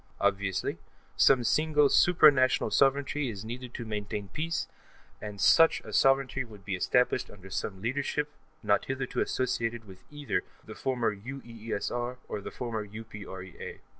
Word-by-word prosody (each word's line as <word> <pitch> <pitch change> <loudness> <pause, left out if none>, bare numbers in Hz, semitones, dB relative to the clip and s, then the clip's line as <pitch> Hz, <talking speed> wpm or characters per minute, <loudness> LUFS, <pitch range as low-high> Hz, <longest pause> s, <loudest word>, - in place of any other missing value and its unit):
Obviously, 100 -2 0 0.4
some 130 -3 +5
single 150 +3 +3
supra 155 +1 +6
national 130 -2 +2
sovereignty 140 0 +2
is 105 -2 -6
needed 125 +2 -6
to 120 - -5
maintain 105 -2 -4
peace, 165 +1 -2 0.5
and 105 -1 -7
such 165 - +6
a - - -10
sovereignty 135 0 +3
should 105 -6 -9
be 100 - -3
established 125 +6 +1
under 95 -1 -13
some 95 0 -4
leadership 140 +4 -1 0.3
not 100 -1 +2
hitherto 135 -1 -2
associated 115 -2 -1
with 95 -2 -14
either 145 -1 -2 0.2
the - - -8
former 120 -5 -1
UEESR 120 +1 -4
or 105 - -4
the - - -6
former 115 -3 -4
UPREA. 100 -3 -9
120 Hz, 140 wpm, -29 LUFS, 105-135 Hz, 0.5 s, supra